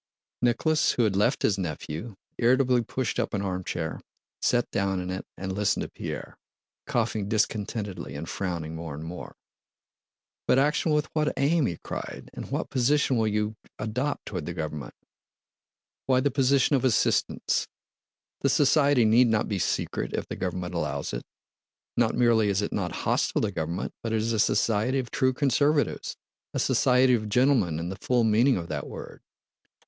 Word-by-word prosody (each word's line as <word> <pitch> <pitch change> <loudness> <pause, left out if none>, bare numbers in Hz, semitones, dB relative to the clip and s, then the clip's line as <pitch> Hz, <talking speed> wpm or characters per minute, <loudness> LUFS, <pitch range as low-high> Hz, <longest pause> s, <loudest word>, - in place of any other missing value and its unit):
Nicholas, 140 +6 +2
who 120 - +2
had 105 -3 +1
left 100 - +2
his 100 -2 +2
nephew, 85 +4 -5 0.2
irritably 125 0 +4
pushed 125 0 -2
up - - -1
an 100 - -1
armchair, 90 -4 -3 0.4
sat 120 -1 +2
down 95 -1 0
in 90 0 -4
it, 95 - -5
and 95 0 -4
listened 105 +1 +1
to - - -6
Pierre, - - -7 0.5
coughing 110 -4 -1
discontentedly 105 - -2
and 80 +3 -5
frowning 85 -4 -3
more 80 -2 -6
and 75 - -7
more. 85 +2 -8 1.1
"But 125 - +4
action 150 +3 +2
with 150 0 +2
what 150 -1 +1
aim?" 145 0 +3
he 85 - -3
cried. - - -6
"And - - -7
what - - -2
position 135 +1 +2
will 110 -2 +2
you 105 0 -1 0.2
adopt 125 +7 -2
toward 90 -7 -5
the 85 - -4
government?" 75 -3 -5 1.1
"Why, 130 -1 +4
the 140 +2 +1
position 135 +1 +3
of 135 - +1
assistants. 125 -5 +1 0.7
The - - +1
society 140 -3 +4
need 120 +3 +5
not 110 -2 +1
be 100 -3 -2
secret - - -1
if - - -2
the - - -6
government 90 0 -3
allows 75 -4 -2
it. - - -3 0.7
Not 120 -1 +2
merely 115 -3 +4
is 100 +1 +1
it - - -3
not - - -1
hostile - - +1
to 105 - 0
government, 85 +1 -3
but 115 -1 -3
it - - +2
is 110 +1 0
a 110 - 0
society 110 +5 +2
of 130 -3 -3
true 130 0 +2
conservatives—a 145 +3 -1
society 125 0 +4
of 110 -3 0
gentlemen 120 - +3
in 85 +2 -3
the 95 - -5
full 125 -2 +2
meaning 115 +4 +4
of 85 -2 -5
that 75 -3 -4
word. - - -9
110 Hz, 170 wpm, -27 LUFS, 90-130 Hz, 1.1 s, need